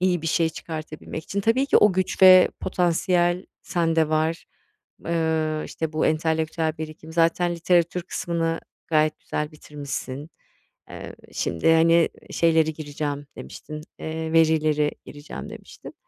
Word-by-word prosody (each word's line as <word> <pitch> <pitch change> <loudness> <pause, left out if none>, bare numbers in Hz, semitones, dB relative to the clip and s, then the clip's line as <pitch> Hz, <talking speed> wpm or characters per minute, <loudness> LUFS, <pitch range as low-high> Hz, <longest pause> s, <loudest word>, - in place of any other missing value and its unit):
İyi 180 -3 +1
bir - - -3
şey 165 +1 +2
çıkartabilmek 160 -1 -7
için. 200 - -2
Tabii 230 +7 +2
ki - - +4
o 210 - +5
güç 185 +1 -1
ve 185 -1 +9
potansiyel 175 0 +1 0.2
sende 165 -3 +1
var, 155 +1 0 0.6
eee, 160 -2 0
işte, 160 -1 -4
bu 155 - +1
entelektüel 160 0 0
birikim 155 0 -8
zaten 170 +1 +2
literatür 170 +1 +2
kısmını 165 -2 -2 0.3
gayet 155 -1 +2
güzel 150 +1 -4
bitirmişsin. 145 -1 -7 0.6
Eee, - - -8 0.2
şimdi 85 - +1
hani, 165 +1 +5 0.2
"Şeyleri 160 -1 +2
gireceğim" 145 -1 -4
demiştin, 155 0 -8 0.2
eee, 160 0 -4
"verileri 155 -2 +3 0.2
gireceğim." 145 0 -9
demiştin. - - -11
160 Hz, 125 wpm, -24 LUFS, 155-170 Hz, 0.6 s, ve